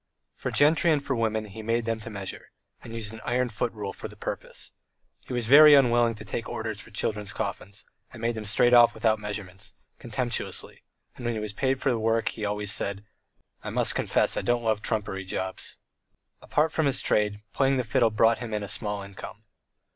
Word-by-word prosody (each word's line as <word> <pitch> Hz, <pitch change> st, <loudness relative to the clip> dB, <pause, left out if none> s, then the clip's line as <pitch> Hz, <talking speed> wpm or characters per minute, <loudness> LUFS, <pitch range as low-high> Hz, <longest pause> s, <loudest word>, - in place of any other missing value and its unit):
For -, -, -4 dB
gentry 155 Hz, +3 st, +4 dB
and 145 Hz, -2 st, +1 dB
for 135 Hz, -, 0 dB
women 110 Hz, -2 st, 0 dB
he 105 Hz, +2 st, -9 dB
made 115 Hz, +1 st, 0 dB
them 115 Hz, 0 st, -1 dB
to 110 Hz, -, -8 dB
measure, 100 Hz, -3 st, -6 dB, 0.3 s
and 115 Hz, -, -9 dB
used 110 Hz, -2 st, -4 dB
an 110 Hz, -, -9 dB
iron 125 Hz, +1 st, 0 dB
foot 115 Hz, +2 st, -2 dB
rule 105 Hz, -3 st, -5 dB
for -, -, -7 dB
the -, -, -13 dB
purpose. -, -, -5 dB, 0.6 s
He -, -, -5 dB
was 120 Hz, -2 st, -1 dB
very 145 Hz, +4 st, +9 dB
unwilling 120 Hz, -3 st, +4 dB
to 110 Hz, -, -10 dB
take 115 Hz, +1 st, -4 dB
orders 110 Hz, -2 st, -4 dB
for 110 Hz, -, -10 dB
children's 105 Hz, -1 st, -2 dB
coffins, 100 Hz, +2 st, -5 dB, 0.3 s
and -, -, -11 dB
made 115 Hz, +1 st, 0 dB
them 110 Hz, -1 st, -6 dB
straight 120 Hz, +4 st, +3 dB
off 120 Hz, -1 st, +7 dB
without 110 Hz, -1 st, +2 dB
measurements, 105 Hz, -3 st, -5 dB, 0.2 s
contemptuously, -, -, -2 dB, 0.3 s
and 125 Hz, -, -10 dB
when 120 Hz, -1 st, -1 dB
he -, -, -2 dB
was 105 Hz, -1 st, -4 dB
paid 130 Hz, +2 st, 0 dB
for 135 Hz, -, +1 dB
the 120 Hz, -, 0 dB
work 115 Hz, 0 st, +1 dB
he 110 Hz, -, -7 dB
always 105 Hz, -1 st, 0 dB
said: 100 Hz, 0 st, -2 dB, 0.6 s
"I -, -, -4 dB
must -, -, +1 dB
confess -, -, +1 dB
I -, -, -1 dB
don't 120 Hz, 0 st, 0 dB
like 110 Hz, -2 st, +1 dB
trumpery 100 Hz, -4 st, -2 dB
jobs." 95 Hz, 0 st, -4 dB, 0.6 s
Apart 155 Hz, +1 st, +1 dB
from 160 Hz, -3 st, +1 dB
his 135 Hz, -, 0 dB
trade, 105 Hz, 0 st, 0 dB
playing 135 Hz, 0 st, +2 dB
the 125 Hz, -, +1 dB
fiddle 120 Hz, 0 st, +2 dB
brought 115 Hz, +1 st, +3 dB
him 115 Hz, -3 st, -4 dB
in 105 Hz, -, -2 dB
a -, -, -5 dB
small 105 Hz, +1 st, -3 dB
income. 100 Hz, +2 st, -10 dB
110 Hz, 205 wpm, -27 LUFS, 105-120 Hz, 0.6 s, very